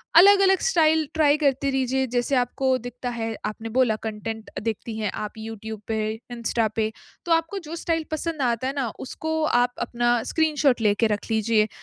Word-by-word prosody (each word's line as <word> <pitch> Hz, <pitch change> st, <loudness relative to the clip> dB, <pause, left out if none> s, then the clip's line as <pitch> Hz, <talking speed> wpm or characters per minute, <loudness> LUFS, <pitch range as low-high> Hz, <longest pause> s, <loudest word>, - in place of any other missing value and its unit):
अलग-अलग 385 Hz, +1 st, +7 dB
style 320 Hz, -8 st, +3 dB
try 305 Hz, -2 st, +4 dB
करते 280 Hz, -2 st, +1 dB
रीजिए 265 Hz, 0 st, +1 dB
जैसे 245 Hz, +3 st, 0 dB
आपको 255 Hz, +1 st, +1 dB
दिखता 245 Hz, 0 st, -6 dB
है, 225 Hz, -2 st, -3 dB
आपने 225 Hz, +2 st, -4 dB
बोला 245 Hz, -4 st, +4 dB
कंटेंट 220 Hz, 0 st, -5 dB
देखती 225 Hz, 0 st, -3 dB
हैं 210 Hz, -3 st, -1 dB
आप 210 Hz, -, -5 dB
यूट्यूब 220 Hz, -1 st, -7 dB
पे, 215 Hz, -1 st, -1 dB, 0.2 s
इंस्टा 230 Hz, -1 st, 0 dB
पे। 220 Hz, -1 st, 0 dB, 0.3 s
तो 345 Hz, -, -3 dB
आपको 330 Hz, +4 st, 0 dB
जो 325 Hz, -, -5 dB
स्टाइल 330 Hz, -1 st, -1 dB
पसंद 315 Hz, -1 st, -2 dB
आता 245 Hz, 0 st, 0 dB
है 270 Hz, -, -2 dB
ना, 265 Hz, -4 st, 0 dB
उसको 315 Hz, +4 st, -3 dB
आप 245 Hz, -2 st, +2 dB
अपना 240 Hz, 0 st, +1 dB, 0.2 s
स्क्रीनशॉट 300 Hz, -6 st, +2 dB
लेके 215 Hz, +1 st, +3 dB
रख 210 Hz, -1 st, 0 dB
लीजिए। 220 Hz, -1 st, +2 dB
245 Hz, 175 wpm, -24 LUFS, 225-305 Hz, 0.3 s, अलग-अलग